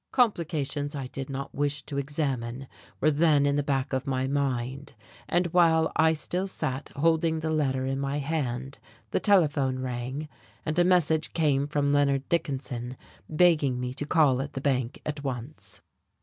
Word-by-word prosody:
Complications 155 - 0
I 135 -2 -4
did 135 +1 -6
not 135 0 -5
wish 145 0 -1
to 140 0 -4
examine 135 -3 -3 0.3
were 155 - +3
then 150 -1 +4
in 140 0 +2
the 145 - +2
back 135 -2 -1
of 130 +1 -1
my 130 -1 0
mind; 135 -1 -2 0.3
and 175 +1 +2
while 160 -2 +4
I 160 0 +4
still 180 +4 -2
sat 145 -7 -4
holding 160 +2 +2
the 160 0 -1
letter 135 -4 0
in 135 +1 -1
my 140 +1 -1
hand 135 -3 -3 0.3
the - - +1
telephone 145 -9 +3
rang, 130 +3 -4 0.4
and 155 +3 0
a - - +6
message 170 -3 +2
came 145 -4 +2
from 145 -1 +1
Leonard 140 -1 +2
Dickinson 130 -6 -2 0.3
begging 155 -6 +3
me 125 0 -3
to 145 +2 -4
call 145 -6 +3
at 140 +1 -6
the 135 - -4
bank 130 -3 0
at 150 -1 -4
once. 130 +2 -6
145 Hz, 165 wpm, -27 LUFS, 135-155 Hz, 0.4 s, a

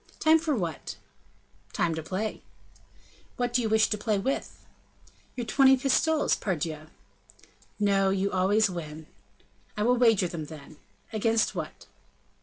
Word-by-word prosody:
"Time 320 +1 +5
for 315 -3 -1
what?" 170 - -4 0.8
"Time 170 -1 0
to 160 - -4
play." 190 +7 -4 1.0
"What 245 -1 -1
do 250 - +3
you 225 - -1
wish 220 0 +4
to 210 - -1
play 210 -1 0
with?" 265 +8 -3 0.7
"Your 245 - -4
twenty 265 +4 +5
pistoles, 290 +4 +2
pardieu!" 155 -4 -3 0.9
"No; 195 -2 +3
you 195 +1 0
always 205 +4 +3
win." 160 -4 -7 0.7
"I 210 - 0
will 245 +2 +3
wager 225 -6 +4
them, 165 -2 -6
then." 150 0 -12 0.4
"Against 225 +1 +1
what?" - - -6
210 Hz, 135 wpm, -27 LUFS, 170-245 Hz, 1.0 s, Time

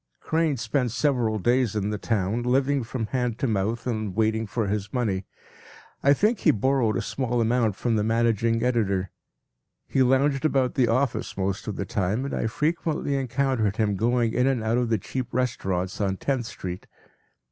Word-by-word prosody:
” - - -45
Crane 160 -3 0
spent 120 +2 0
several 120 -3 +1
days 120 +1 +1
in 105 0 -1
the 105 - -3
town, 110 +1 0
living 135 +3 +2
from 115 0 -3
hand 125 -1 -1
to 135 - -1
mouth 110 0 -1
and 110 -6 -2
waiting 110 0 +1
for 110 +1 -1
his 105 0 -2
money. 100 -7 -1 0.7
I 140 - +4
think 210 - +2
he - - +3
borrowed 120 0 +2
a - - -2
small 125 -3 -1
amount 115 -2 +2
from 115 +1 0
the 105 - +1
managing 115 0 +1
editor. 100 -7 0 0.8
He 135 - +1
lounged 135 +2 +3
about 135 -5 +2
the 130 -4 +2
office 125 -1 0
most 95 0 -2
of 105 - -3
the 100 - -3
time, 100 +7 -1
and 140 - -4
I - - 0
frequently 150 +2 -1
encountered 130 -5 0
him 105 -2 +1
going 115 +2 +1
in 125 +2 +2
and 130 -5 +1
out 115 +2 +1
of 120 -2 0
the 110 - +2
cheap 125 +5 -5
restaurants 95 -7 -1
on 95 -1 0
Tenth 130 -2 -1
Street. 90 0 -7
115 Hz, 185 wpm, -25 LUFS, 105-130 Hz, 0.8 s, I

